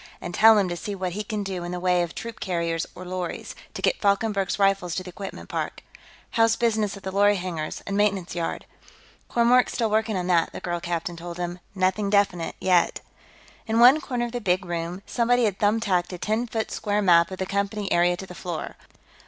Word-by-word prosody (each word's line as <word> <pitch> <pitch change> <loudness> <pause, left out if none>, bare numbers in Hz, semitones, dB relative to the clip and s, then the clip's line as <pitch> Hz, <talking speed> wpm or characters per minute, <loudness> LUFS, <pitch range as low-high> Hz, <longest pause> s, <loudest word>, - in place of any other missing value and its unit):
And 175 - -6
tell 220 +3 +7
him 200 -2 +2
to 175 - -3
see 200 +4 -5
what 185 -1 -3
he 210 +4 -4
can 210 -1 -3
do 190 -3 -4
in 175 - -5
the 180 - -3
way 180 0 +2
of 175 -1 -3
troop 230 -1 -7
carriers 170 -3 -1
or 185 - -9
lorries, 180 -1 -4 0.2
to - - -6
get - - +1
Falkenberg's 200 -1 +1
Rifles 195 -4 +2
to 185 - -2
the 180 - -9
equipment 195 +2 -8
park.... - - -4 0.5
How's 225 0 +3
business 220 -4 0
at 195 - -13
the 190 - -4
lorry 205 +1 +4
hangars 175 -5 -4
and 200 - -3
maintenance 200 -3 +1
yard?" 170 -1 -3 0.6
"Kormork's 240 +1 +4
still 225 -3 0
working 220 -1 +1
on 180 - -2
that," 175 -2 +2
the - - -6
girl 175 -1 -3
captain 170 0 -3
told 170 0 -7
him. 175 0 -4 0.2
"Nothing 190 +2 +1
definite, 195 -5 +1
yet." 180 -2 +2 0.7
In 225 +1 +1
one 255 +6 +7
corner 250 -8 -2
of 240 - -6
the 245 0 -4
big 185 -2 +1
room, 175 +2 -4
somebody 245 0 +2
had 200 -2 -1
thumbtacked 205 -4 +1
a 180 - -5
ten 220 +6 -1
foot 220 -1 -3
square 210 0 -1
map 170 -2 +5
of 190 - -6
the 190 - -2
Company 200 +1 -2
area 175 +1 +3
to 190 - -7
the 180 - -10
floor. 175 -2 -5
190 Hz, 215 wpm, -25 LUFS, 175-215 Hz, 0.7 s, tell